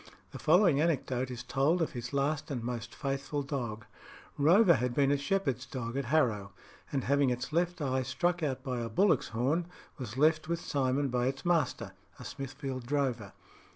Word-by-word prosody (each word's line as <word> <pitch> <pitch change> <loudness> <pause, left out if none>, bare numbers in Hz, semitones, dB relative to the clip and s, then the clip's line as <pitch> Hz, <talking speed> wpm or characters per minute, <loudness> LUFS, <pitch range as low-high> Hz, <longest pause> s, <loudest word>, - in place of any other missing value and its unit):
The - - -8
following 165 -3 +4
anecdote 130 -6 0
is 125 -1 -6
told 140 +7 +1
of 165 - 0
his 120 -1 -6
last 145 +2 -1
and 125 -5 -3
most 120 -2 -5
faithful 140 +3 -2
dog: 120 -6 -4 0.5
Rover 175 +6 +6
had 125 -3 -1
been 140 -1 +3
a - - +4
shepherd's 140 -4 -1
dog 125 -4 -5
at 140 -1 -1
Harrow, 115 -9 +1 0.4
and 135 -3 -1
having 140 0 +3
its 125 +4 -3
left 175 +1 +1
eye 130 -1 0
struck 175 +6 0
out 140 -5 -2
by 125 -2 -2
a 115 -1 -3
bullock's 180 - +3
horn, 140 +10 0 0.3
was 120 -2 -6
left 155 +2 +3
with 170 0 0
Simon 140 -2 0
by 125 0 0
its 135 +3 -3
master, 165 -6 +1 0.3
a - - -9
Smithfield 135 -2 -6
drover. 130 -8 -1
135 Hz, 180 wpm, -31 LUFS, 125-155 Hz, 0.5 s, Rover